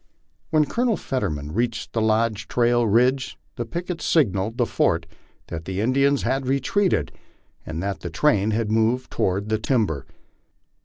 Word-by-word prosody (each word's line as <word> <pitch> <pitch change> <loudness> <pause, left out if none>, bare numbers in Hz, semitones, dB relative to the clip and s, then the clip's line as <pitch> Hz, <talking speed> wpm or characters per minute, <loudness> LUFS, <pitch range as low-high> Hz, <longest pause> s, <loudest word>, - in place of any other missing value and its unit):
When 155 -2 +3
Colonel 235 - 0
Fetterman 75 - -3
reached 115 +2 -2
Lodge 110 -1 +1
Trail 120 -1 +2
ridge 125 - +2 0.2
the 120 - -3
picket 170 +3 -4
signalled 110 - +1
the - - +2
fort - - +1 0.4
that 80 -1 -6
the 95 +1 -3
Indians 135 +5 +2
had 130 +2 0
retreated, 140 +9 +1 0.6
and 80 +3 -4
that 100 0 -2
the 85 - -5
train 105 - +2
had 110 0 0
moved 115 +3 +1
toward 100 +3 -1
the 110 0 +1
timber. 105 - 0
115 Hz, 145 wpm, -23 LUFS, 100-135 Hz, 0.6 s, When